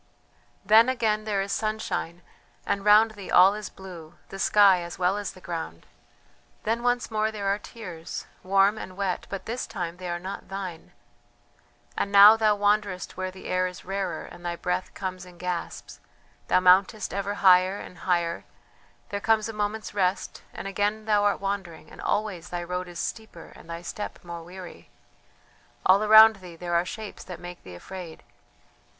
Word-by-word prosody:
"Then 220 +5 +6
again 220 -4 0
there 200 -2 0
is 200 - -6
sunshine, 215 -5 -3 0.4
and 200 - -1
round 210 +2 +6
thee 205 -3 -10
all 190 +2 +7
is 210 -1 -6
blue, 175 -4 -11
the 195 - -8
sky 195 -3 +5
as 170 0 -7
well 180 +2 +2
as 205 -1 -4
the - - -14
ground 165 - -6 0.8
then 225 +2 0
once 245 -1 0
more 215 0 0
there 210 -2 -5
are 200 +1 +1
tears, 180 -8 -8 0.2
warm 195 +3 +3
and 185 -2 -9
wet, 195 -2 -2
but 195 - -6
this 240 +3 -4
time 170 0 -5
they 180 -1 -6
are 175 - -2
not 190 +3 -7
thine.... 190 -4 -6 1.0
And 200 - -2
now 200 +2 +10
thou 215 -2 +3
wanderest 205 -2 0
where 185 0 -3
the 185 0 -13
air 185 0 +1
is 180 - -10
rarer 195 -1 -3
and 175 - -13
thy 175 0 -2
breath 180 +1 -2
comes 185 -2 -5
in 180 -1 -14
gasps 180 -1 -5 0.5
thou - - +4
mountest 185 +4 +3
ever 200 +1 -2
higher 185 0 +5
and 180 - -11
higher... 170 -2 0 0.7
there 200 0 -4
comes 220 0 +2
a 225 - -6
moment's 210 +1 -3
rest 190 -1 -1
and - - -7
again 205 +2 -1
thou 210 -2 +3
art 205 - +2
wandering, 190 -6 -5
and - - -11
always 195 -5 -2
thy 175 -1 -4
road 180 +1 -4
is 175 -1 -10
steeper 220 -6 -6
and - - -15
thy 170 +1 -6
step 205 +4 -6
more 170 -1 -7
weary.... 180 +1 -11 1.0
All 190 +2 +6
around 220 0 +8
thee 180 -3 -11
there 175 +1 -5
are 170 +1 +2
shapes 215 +2 -7
that 180 -2 -8
make 175 0 -9
thee 90 -1 -11
afraid. 175 - -9
195 Hz, 180 wpm, -26 LUFS, 180-210 Hz, 1.0 s, now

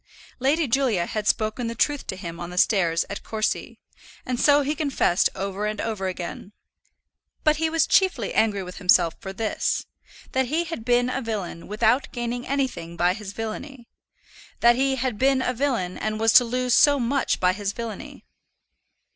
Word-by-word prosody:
Lady 285 +4 +2
Julia 230 -8 +1
had 210 +2 -4
spoken 220 +3 0
the 230 - -4
truth 290 +4 0
to - - -3
him 170 -2 -7
on 175 - -6
the 180 - -9
stairs 175 -5 +2
at 200 - -6
Courcy, 215 -1 -3 0.5
and 250 -1 -2
so 290 0 +5
he 290 +2 -1
confessed 280 - +1
over 200 +2 -3
and 215 0 -4
over 210 -4 -2
again. 185 +2 -6 0.9
But 305 -1 +3
he 320 +1 0
was 325 0 +2
chiefly 380 0 +2
angry 205 -3 +1
with 180 0 -9
himself 180 -3 +4
for 195 -3 -7
this, 215 +3 -1 0.5
that 260 -1 +1
he 315 +6 0
had 330 -9 -6
been 245 +1 +2
a 265 - -2
villain 205 -8 -5
without 225 +5 +1
gaining 240 0 -4
anything 260 -12 -2
by 175 +2 +3
his 200 0 -8
villany; 235 +3 -6 0.7
that 240 0 +6
he 270 +1 +1
had 250 -4 -2
been 270 0 +3
a 255 -1 0
villain, 235 -9 -1
and 215 0 -2
was 225 0 +3
to 250 - +8
lose 250 +1 0
so 285 -1 +5
much 260 +3 0
by 180 0 +3
his 200 0 -3
villany. 230 -1 -8
230 Hz, 180 wpm, -24 LUFS, 195-265 Hz, 0.9 s, to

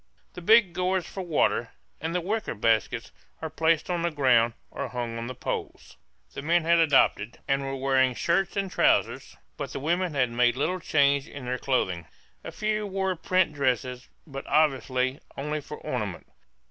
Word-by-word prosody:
The 180 - -8
big 210 -1 +5
gourds 185 0 0
for 190 - -6
water, 170 -5 +1 0.3
and 165 +3 -3
the 180 - +1
wicker 210 - -2
baskets, 110 0 0 0.3
are 160 -1 -5
placed 160 0 +1
on 175 -2 -1
the 170 - +1
ground, 125 -6 +3 0.2
or - - -4
hung 120 -2 -4
on 115 - -5
the 130 - -6
poles. - - -5 0.4
The - - -5
men 170 +3 +2
had 170 +1 +4
adopted, 135 -8 +3
and 135 -1 +1
were 135 0 -3
wearing, 130 -1 +2
shirts 175 +7 0
and 195 -2 -1
trousers, - - +1 0.2
but - - -5
the - - -4
women 170 +3 0
had 125 -3 +2
made 120 +1 +2
little 180 +7 0
change 140 -4 +2
in 140 -3 -9
their 125 +1 -2
clothing. 95 -11 -1 0.4
A - - -6
few 215 0 -1
wore 190 -1 -1
print 185 -1 +1
dresses, 125 -2 -1 0.2
but 135 -3 -8
obviously 130 -3 +1 0.2
only 150 +2 -2
for 150 +1 -8
ornament. 105 -8 -4
145 Hz, 175 wpm, -27 LUFS, 125-175 Hz, 0.4 s, big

